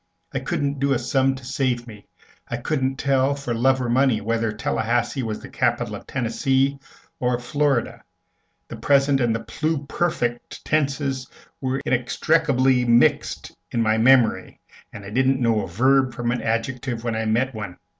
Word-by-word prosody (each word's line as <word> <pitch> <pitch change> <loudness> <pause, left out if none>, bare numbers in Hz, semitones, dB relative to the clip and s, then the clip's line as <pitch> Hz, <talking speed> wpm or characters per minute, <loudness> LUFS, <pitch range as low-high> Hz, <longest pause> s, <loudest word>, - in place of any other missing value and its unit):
I - - -1
couldn't 140 -1 -2
do 140 0 +2
a - - +2
sum 130 +2 +1
to 130 -2 -11
save 125 -2 -1
me; 105 -4 -13 0.4
I - - -3
couldn't 135 -3 -1
tell, 135 0 +1
for 140 -4 -4
love 130 +3 +2
or 125 - -2
money, 125 -1 +2
whether 115 +1 -1
Tallahassee 115 +4 -1
was 110 -3 -4
the - - -9
capital - - -1
of - - -11
Tennessee 135 +3 0 0.4
or 125 -1 +1
of 120 - -7
Florida; 140 -1 0 0.6
the - - -8
present 140 -1 +3
and 120 -2 +1
the 115 - -3
pluperfect 155 -5 -2
tenses 140 -3 -1 0.3
were 130 0 -1
inextricably 130 0 +2
mixed 120 0 +2
in 115 - 0
my 110 0 +2
memory, 125 -1 +3 0.3
and 100 -1 -10
I 100 - -8
didn't 130 +3 +2
know 115 -3 +2
a 95 - -5
verb 130 +7 +2
from 120 0 -1
an 125 - -2
adjective 120 +1 -2
when 120 -1 -1
I 110 0 -2
met 120 +5 +1
one. 105 -5 -7
130 Hz, 165 wpm, -23 LUFS, 115-135 Hz, 0.6 s, present